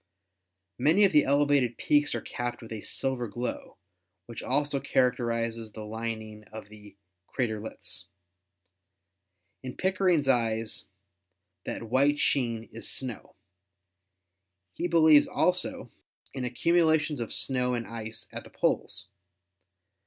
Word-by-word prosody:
Many 165 +10 +5
of 195 - +3
the 150 - +5
elevated 140 -4 +3
peaks 145 0 +2
are - - -2
capped 120 -1 -4
with 115 - -11
a 110 -2 -5
silver 130 -3 -1
glow, 120 +4 -5 0.5
which - - -8
also 145 -1 +1
characterizes 115 -4 0
the 110 -1 -7
lining 110 -1 -5
of 110 -1 -10
the 105 -1 -14 0.3
"craterlets." 105 -6 -4 1.6
In 130 -1 -7
Pickering's 185 -6 +2
eyes 115 -3 +1 0.8
that - - -4
white 135 +6 +2
sheen 120 -6 0
is 115 - -5
snow. 125 -4 -4 1.4
He 175 - -2
believes 160 -3 +6
also 180 0 0 0.4
in 130 -2 -3
ac 125 0 -5
cumulations 160 -4 +3
of 115 - -4
snow 125 -2 +1
and 115 -1 -3
ice 110 0 -7
at - - -6
the - - -14
poles. 90 0 -1
125 Hz, 120 wpm, -28 LUFS, 110-145 Hz, 1.6 s, believes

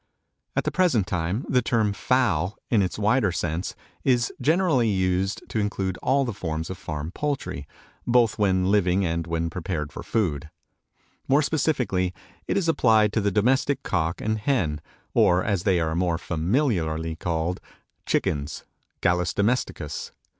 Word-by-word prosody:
At - - +1
the - - -1
present 160 - +2
time 95 +6 -2
the 125 -2 +3
term 110 -3 +1
fowl 100 -7 +1
in 110 -4 +4
its 90 -2 -1
wider 105 0 +2
sense 85 +1 -3 0.3
is 120 -3 +2
generally 160 -7 +3
used 95 0 0
to 110 - -1
include 95 -3 -2
all 135 +1 +2
the 120 - -3
forms 80 -3 -4
of 95 - -7
farm 75 +1 -5
poultry, 95 - -3 0.4
both 120 -3 +3
when 95 -2 +2
living 95 -2 +3
and 85 0 -2
when 85 0 -1
prepared 80 -4 -4
for - - -6
food. 80 -9 -1 0.8
More 140 +3 +4
specifically 125 - 0 0.3
it - - 0
is 190 -4 0
applied 110 -9 +4
to 110 - +1
the 100 - +2
domestic 130 +7 +1
cock 85 -1 -1
and 110 0 -1
hen, 90 - 0 0.3
or, 90 +1 +4
as 100 -5 -1
they 95 -4 +3
are 80 -1 0
more 85 0 +1
familiarly 80 - 0
called, 85 +2 -2 0.5
chickens 70 +1 -1 0.4
(Gallus 90 -1 +1
domesticus). 100 - -1
95 Hz, 150 wpm, -25 LUFS, 85-120 Hz, 0.8 s, in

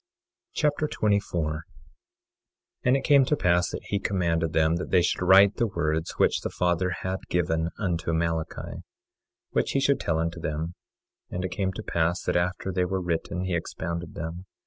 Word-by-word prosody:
3 - - -1
Nephi 145 - 0
Chapter 155 - +1
24 100 - 0
24:1 75 - -5 1.2
And 125 +2 +5
it 135 - -4
came 140 -3 +6
to 145 +3 +1
pass 90 -6 +2
that - - -6
he 100 - -1
commanded 85 -5 0
them 80 0 +3
that 90 - -5
they 90 -2 +4
should - - 0
write 95 +2 +6
the 120 - +2
words 80 -4 -1
which - - +3
the - - -3
Father 90 +1 +1
had 95 +1 -2
given 80 -2 +1
unto 85 -5 -1
Malachi, 80 -1 -2 0.7
which - - 0
he 135 - +3
should 135 +1 +2
tell 80 - 0
unto 85 +1 -2
them. 80 +1 -3 0.6
And 90 +1 -3
it 90 - -3
came 95 +1 -1
to 110 - -6
pass 85 0 0
that - - -1
after 90 +2 0
they 90 0 +1
were 95 +1 -1
written 90 0 -2
he 95 -1 -2
expounded 85 0 -4
them. 85 +3 -6
90 Hz, 190 wpm, -26 LUFS, 80-95 Hz, 1.2 s, came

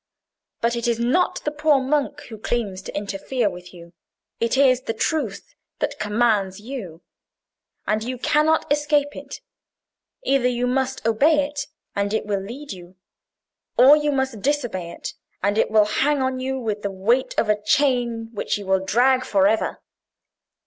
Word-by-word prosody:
But 235 +1 +1
it 235 0 -2
is 235 -1 +1
not 250 +10 +1
the 300 - -1
poor 300 -1 +3
monk 275 +2 -1
who 220 -3 -10
claims 210 -5 -2
to - - -7
interfere 205 +3 -1
with 180 0 -11
you: 170 -1 -14 0.5
it 230 +3 +1
is 260 -2 +4
the 225 - -4
truth 245 -5 -2 0.2
that - - -3
commands 210 -3 +1
you. 205 -8 -8 0.8
And 215 +1 0
you 255 +2 -4
cannot 305 +5 +2
escape 295 -1 +1
it. - - -9 0.8
Either 270 -2 +2
you 245 0 0
must 260 -1 -1
obey 285 +7 +4
it, 285 -2 -5 0.3
and 200 +1 0
it - - -1
will 200 -2 -1
lead 255 +9 -8
you; 180 -1 -10 0.8
or 265 +4 +8
you 300 -1 +1
must 265 -6 -1
disobey 240 -11 -1
it, - - -7 0.3
and 200 +1 +2
it - - +2
will 215 -1 +5
hang 280 +7 +1
on 260 0 -1
you 265 +1 -2
with 215 -4 -3
the 200 - -2
weight 220 +7 0
of 225 - +2
a 210 0 +1
chain 235 -1 +1
which 205 - -1
you 205 - -8
will 190 0 +1
drag 255 +6 +3
for 200 -7 +2
ever. 220 +2 0
235 Hz, 170 wpm, -23 LUFS, 205-270 Hz, 0.8 s, or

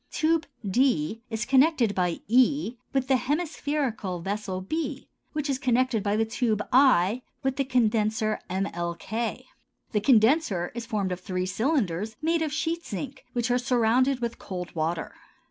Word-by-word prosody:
Tube 320 0 +1 0.2
d 225 - +1
is 220 0 -2
connected 265 -4 +4
by 180 -3 -1
e 255 +2 +3 0.2
with 270 -2 0
the 265 -1 +4
hemispherical 285 - -2
vessel 195 +1 -3
b 310 - -4 0.3
which 300 -1 -2
is 270 -2 -1
connected 255 -4 +2
by 205 +1 0
the 225 +1 +2
tube 220 -2 -1
i 250 -4 +5 0.2
with 265 -1 0
the 275 - +2
condenser 220 -4 +1
mlk. 185 +4 -3 0.5
The 210 - +1
condenser 220 - +3
is 235 0 -6
formed 200 -4 -1
of 180 - -3
three 185 -1 -3
cylinders 220 - 0
made 330 +1 +1
of 315 -2 -1
sheet 325 +2 -2
zinc 260 +6 -6
which 240 -1 0
are 245 - +3
surrounded 250 +1 +2
with 235 -1 -3
cold 180 -2 -6
water. 165 +1 -2
235 Hz, 150 wpm, -27 LUFS, 200-270 Hz, 0.5 s, i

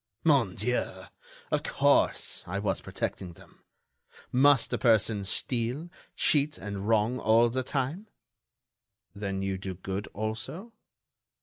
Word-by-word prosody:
"Mon - - +3
Dieu! - - -1 0.5
of - - +1
course, 140 0 +1
I 95 +3 -3
was 100 -3 -1
protecting 90 -2 -4
them. - - -19 0.7
Must 135 0 +4
a - - 0
person 110 -3 +3
steal, 125 - -1 0.2
cheat 145 0 +2
and 100 -1 -5
wrong 115 +3 +2
all 115 +1 +4
the 130 +2 -1
time?" 145 - -3 1.1
"Then 100 -1 -3
you 95 -1 -2
do 95 -1 -5
good, 95 +3 -5
also?" 110 - -5
110 Hz, 120 wpm, -28 LUFS, 100-135 Hz, 1.1 s, Must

